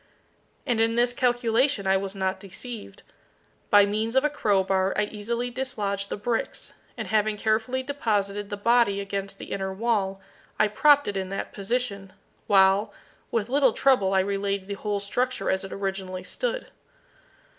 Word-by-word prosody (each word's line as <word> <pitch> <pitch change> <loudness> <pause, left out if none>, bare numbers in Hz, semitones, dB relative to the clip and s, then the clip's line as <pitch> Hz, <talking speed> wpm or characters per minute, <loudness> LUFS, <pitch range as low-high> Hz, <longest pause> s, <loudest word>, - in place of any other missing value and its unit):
And 230 -2 +1
in 225 0 +2
this 240 +1 +3
calculation 245 -1 +1
I 190 0 +3
was 195 +1 -2
not 190 -1 -1
deceived. 205 - -9 0.7
By 205 -1 +7
means 215 +3 -2
of 265 +2 +4
a 300 - +2
crowbar 195 -6 +1
I 210 - +3
easily 235 +4 -3
dislodged 205 -6 -2
the - - -3
bricks, 225 +3 -2 0.2
and - - -5
having 215 -1 +1
carefully 225 +5 0
deposited 205 -7 -1
the 205 - -4
body 230 -2 +3
against 200 0 -4
the - - -9
inner 190 -1 -2
wall, 195 -2 0 0.4
I 215 - +4
propped 285 +7 +5
it 205 -1 -2
in 190 -1 -3
that 195 - -4
position, 200 -2 -3 0.3
while 195 +1 +4 0.4
with 220 -3 -1
little 265 -1 +3
trouble 200 -8 +3
I 190 - +5
relaid 200 0 -2
the 200 - -5
whole 205 0 -2
structure 250 +6 -1
as 190 +1 -1
it 195 - -8
originally 190 -2 -4
stood. - - -3
205 Hz, 160 wpm, -26 LUFS, 195-240 Hz, 0.7 s, By